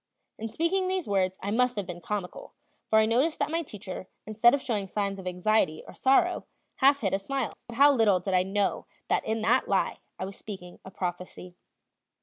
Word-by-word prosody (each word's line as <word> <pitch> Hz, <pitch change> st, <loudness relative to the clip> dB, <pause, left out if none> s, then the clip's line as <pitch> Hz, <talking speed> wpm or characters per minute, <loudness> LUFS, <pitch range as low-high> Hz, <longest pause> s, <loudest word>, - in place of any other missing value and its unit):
In 225 Hz, -, -3 dB
speaking 360 Hz, -, 0 dB
these 370 Hz, -1 st, -1 dB
words 190 Hz, -2 st, +1 dB
I 200 Hz, -, -2 dB
must 250 Hz, +2 st, +2 dB
have 205 Hz, -2 st, -2 dB
been 175 Hz, -1 st, -7 dB
comical; 195 Hz, 0 st, -5 dB, 0.4 s
for 220 Hz, -, +4 dB
I 220 Hz, -, +6 dB
noticed 260 Hz, +9 st, +2 dB
that -, -, -1 dB
my 330 Hz, +1 st, 0 dB
teacher, 195 Hz, -, -8 dB, 0.2 s
instead 220 Hz, +3 st, +5 dB
of -, -, -2 dB
showing 220 Hz, -7 st, -2 dB
signs 200 Hz, 0 st, -2 dB
of 185 Hz, -, -7 dB
anxiety 180 Hz, -3 st, +1 dB
or -, -, -10 dB
sorrow, 345 Hz, +7 st, +2 dB, 0.3 s
half 280 Hz, +1 st, +4 dB
hid 195 Hz, -4 st, 0 dB
a 195 Hz, -, +2 dB
smile. 265 Hz, +3 st, -3 dB
But 235 Hz, -, -8 dB
how 285 Hz, +2 st, +7 dB
little 215 Hz, -7 st, +4 dB
did 190 Hz, +2 st, -3 dB
I 180 Hz, -, +5 dB
know 195 Hz, +2 st, -1 dB, 0.2 s
that -, -, +2 dB
in 220 Hz, 0 st, -1 dB
that -, -, +3 dB
lie -, -, +1 dB, 0.2 s
I -, -, -3 dB
was 195 Hz, +1 st, -8 dB
speaking 185 Hz, -4 st, -9 dB
a -, -, -9 dB
prophecy! 180 Hz, -1 st, -6 dB
210 Hz, 205 wpm, -28 LUFS, 190-260 Hz, 0.4 s, how